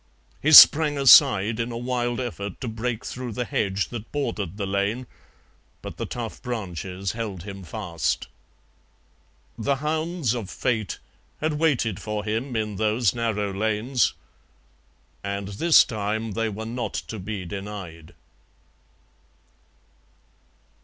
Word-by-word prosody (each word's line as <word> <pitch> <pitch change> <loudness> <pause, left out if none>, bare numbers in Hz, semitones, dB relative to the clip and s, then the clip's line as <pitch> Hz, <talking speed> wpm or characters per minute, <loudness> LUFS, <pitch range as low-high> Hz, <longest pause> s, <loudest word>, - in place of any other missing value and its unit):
He 155 - +2
sprang 150 -1 +9
aside 120 -6 +6
in 115 +1 -2
a 115 - -4
wild 120 0 -2
effort 100 -6 -5
to 125 - -4
break 115 +1 -3
through 125 -2 -5
the 125 +3 -2
hedge 100 -2 -1
that 115 -2 -8
bordered 105 - -3
the 100 - -2
lane, 100 +6 -1 0.8
but - - -8
the - - -4
tough 115 -2 -6
branches 95 -5 -4
held 105 -7 -5
him 100 -1 -8
fast. 90 -3 -3 1.3
The 140 +5 +1
hounds 155 -1 -1
of 115 -6 -5
Fate 110 +3 -2 0.4
had 155 -1 -1
waited 125 - +1
for 105 -1 -4
him 115 +4 -3
in 105 -2 -2
those 110 +1 +1
narrow 105 -4 -1
lanes, 110 +5 +1 1.1
and 100 0 -4
this 160 +12 +5
time 110 0 -3
they 115 +2 -1
were 110 +2 -6
not 120 +2 -4
to 110 - -5
be 95 0 -5
denied. 95 -4 -8
110 Hz, 125 wpm, -24 LUFS, 100-125 Hz, 1.3 s, sprang